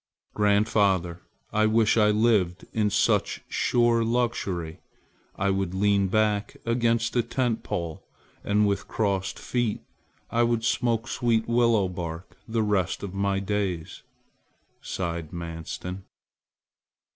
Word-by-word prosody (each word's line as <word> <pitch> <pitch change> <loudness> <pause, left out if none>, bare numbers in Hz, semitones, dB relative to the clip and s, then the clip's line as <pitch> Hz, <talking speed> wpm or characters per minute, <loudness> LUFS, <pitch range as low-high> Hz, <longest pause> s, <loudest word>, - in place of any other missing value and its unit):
"Grandfather, 100 -4 +2 0.3
I 110 0 +3
wish 110 0 +3
I 105 -2 +4
lived 105 -5 +2
in 105 -2 +2
such - - +1
sure 120 -1 +2
luxury! 110 -9 -1 0.6
I 100 +1 +1
would 95 -2 -1
lean 100 0 +3
back 105 0 0
against 115 0 +1
a 120 - +4
tent 120 -1 -1
pole, 85 -2 -4 0.4
and 105 +1 +2
with 100 0 -1
crossed 95 -3 -1
feet 120 -4 -1 0.5
I 120 - +2
would 115 -1 +1
smoke 115 0 +1
sweet 115 -4 0
willow 115 -4 +3
bark 85 -1 -6
the 115 -1 0
rest 100 -4 0
of 100 -2 -5
my 100 0 0
days," 100 -4 -3 0.8
sighed 85 -4 -4
Manstin. 85 +2 -6
105 Hz, 120 wpm, -26 LUFS, 95-115 Hz, 0.8 s, I